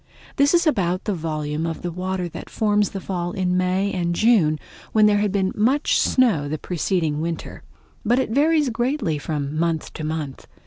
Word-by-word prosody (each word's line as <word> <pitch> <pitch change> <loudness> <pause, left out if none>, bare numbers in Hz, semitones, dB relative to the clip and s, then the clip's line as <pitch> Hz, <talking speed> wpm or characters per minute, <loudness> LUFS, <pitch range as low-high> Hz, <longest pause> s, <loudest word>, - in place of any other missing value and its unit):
This 285 +4 +4
is 345 - +3
about 185 - +1
the 210 - -1
volume 155 -1 -3
of 165 +2 -5
water 185 0 -2
that - - -9
forms 210 -1 +1
the 195 - -5
Fall 175 -2 -3
in 180 -1 0
May 185 +2 +1
and 175 -2 -1
June 185 -8 +3 0.4
when 215 -1 +5
there 205 -1 +4
had 205 -1 +1
been 190 -1 0
much 260 +8 +2
snow 210 - +2
the 155 - -2
preceding 165 -3 -1
winter; 165 0 -5 0.4
but 240 +2 +2
it 260 - 0
varies 300 +2 +3
greatly 240 - -1
from 145 -1 -3
month 165 -1 -1
to 155 - -6
month. 155 -3 -4
185 Hz, 180 wpm, -22 LUFS, 160-215 Hz, 0.4 s, when